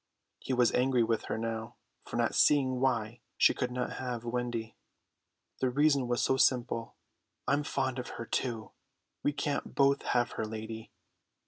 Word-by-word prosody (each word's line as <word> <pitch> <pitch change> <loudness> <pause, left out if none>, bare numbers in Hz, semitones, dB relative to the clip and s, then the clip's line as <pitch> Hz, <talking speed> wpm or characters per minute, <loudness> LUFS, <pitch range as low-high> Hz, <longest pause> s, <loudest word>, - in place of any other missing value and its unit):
He - - -5
was 125 -2 +4
angry 125 -1 +3
with 115 0 0
her - - -2
now 115 +1 -4 0.3
for - - -7
not 120 -1 +1
seeing 130 -3 +4
why 120 -3 0 0.2
she - - +6
could 125 -2 -2
not 125 0 -3
have 125 -3 -4
Wendy. 120 -2 -3 0.8
The 130 - +2
reason 140 -1 +3
was 120 0 +1
so 130 - +2
simple: 120 -3 +1 0.5
"I'm 145 +1 +3
fond 130 -2 -1
of 125 - -5
her 115 - -5
too. 115 -2 -2 0.5
We 145 - +2
can't 145 0 -3
both 140 0 +4
have 120 0 +1
her, 110 - -1
lady." 110 0 -6
125 Hz, 160 wpm, -31 LUFS, 115-130 Hz, 0.8 s, she